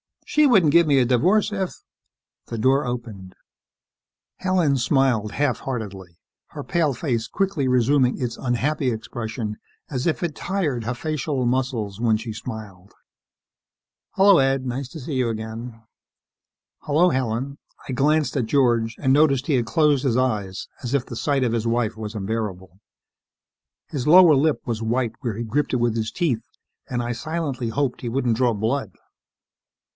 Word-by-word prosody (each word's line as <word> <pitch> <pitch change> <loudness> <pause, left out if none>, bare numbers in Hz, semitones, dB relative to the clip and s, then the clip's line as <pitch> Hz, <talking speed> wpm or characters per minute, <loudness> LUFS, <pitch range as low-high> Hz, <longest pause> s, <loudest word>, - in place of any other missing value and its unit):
She 300 -1 +3
wouldn't 190 - +5
give 170 +1 +5
me 140 -2 +4
a 130 - +4
divorce 180 - +2
if 195 -3 -2 0.4
" - - -67
The 115 - -5
door 130 +5 +2
opened. 115 -7 -6 1.0
Helen 180 -7 +1
smiled 125 -4 +1
half 140 -5 0
heartedly, 95 -9 -6 0.3
her - - -7
pale 160 -5 +1
face 120 -4 -2
quickly 190 -9 -1
resuming 125 +1 +2
its 120 -2 -3
unhappy 130 +2 0
expression 110 -1 -4 0.3
as 130 +1 -2
if 170 - 0
it 170 -3 -1
tired 150 - -2
her 120 - -1
facial 145 -2 -2
muscles 120 -5 -1
when 115 -2 +3
she 115 +1 -6
smiled. 105 -5 -9 1.2
"Hello, 195 -1 +6
Ed. 135 -1 +1
Nice 130 +2 -3
to 160 - -9
see 140 +2 -5
you 125 -2 +1
again." 115 +1 -6 1.0
"Hello, 160 +5 +3
Helen." 130 0 -2 0.3
I - - -1
glanced 145 +1 +1
at 125 - +1
George 120 -3 +2
and 130 -3 +1
noticed 140 -3 +3
he 150 - +2
had 120 -2 +1
closed 150 -2 +2
his 125 -4 +1
eyes 105 -7 -1
as 120 +1 -4
if 140 -3 +1
the 120 - -7
sight 140 -1 +1
of 120 - +1
his 115 0 -1
wife 115 -1 0
was 110 0 -6
unbearable. 95 -3 -4 1.1
His 135 -3 -3
lower 175 0 +8
lip 150 +2 +2
was 115 -2 -3
white 115 +1 0
where 120 -6 -3
he 120 - -3
gripped 140 +7 -1
it - - +3
with 120 -2 +1
his 110 0 -1
teeth 145 -11 -1 0.5
and 120 -1 -1
I 120 - -2
silently 140 0 -3
hoped 125 +3 -1
he 120 - -3
wouldn't 120 -2 0
draw 125 -2 +2
blood. 110 0 -2
125 Hz, 165 wpm, -23 LUFS, 115-145 Hz, 1.2 s, lower